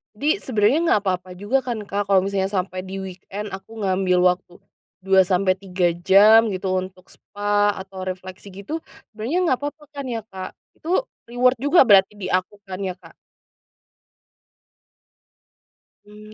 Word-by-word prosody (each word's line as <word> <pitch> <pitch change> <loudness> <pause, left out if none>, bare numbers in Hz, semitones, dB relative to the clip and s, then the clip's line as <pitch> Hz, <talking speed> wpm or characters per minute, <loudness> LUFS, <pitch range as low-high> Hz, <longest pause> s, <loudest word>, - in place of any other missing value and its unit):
Di 310 - 0
sebenernya 220 +3 +2
nggak 210 - +3
apa-apa 185 -2 -2
juga 205 +8 0
kan, 240 -4 -4
Kak, 200 0 -3
kalau 195 -2 +4
misalnya 195 -1 -1
sampai 185 -1 -3
di 195 +1 -5
weekend 190 +2 -7
aku 200 +3 -8
ngambil 185 -1 +2
waktu 180 -1 -9 0.5
2-3 185 -1 +2 0.2
jam, 215 +4 +7
gitu, 185 0 -3
untuk 185 0 -10
spa 205 0 -1
atau 190 0 -8
refleksi 185 +1 -7
gitu, 200 - -6 0.3
sebenernya 230 +10 -3
nggak 265 -8 +1
papa 300 +1 -9
kan 280 -2 -6
ya, 230 -3 -4
Kak? 190 -1 -7 0.2
Itu 360 +9 0 0.2
reward 250 +1 +2
juga 285 +6 +5
berarti 205 -3 +5
di 205 -3 -5
aku 185 +2 -1
kan, 190 -1 -7
ya, 190 -2 -3
Kak? 175 -3 -18 2.9
Mmm, 210 +1 -14
200 Hz, 145 wpm, -22 LUFS, 185-220 Hz, 2.9 s, jam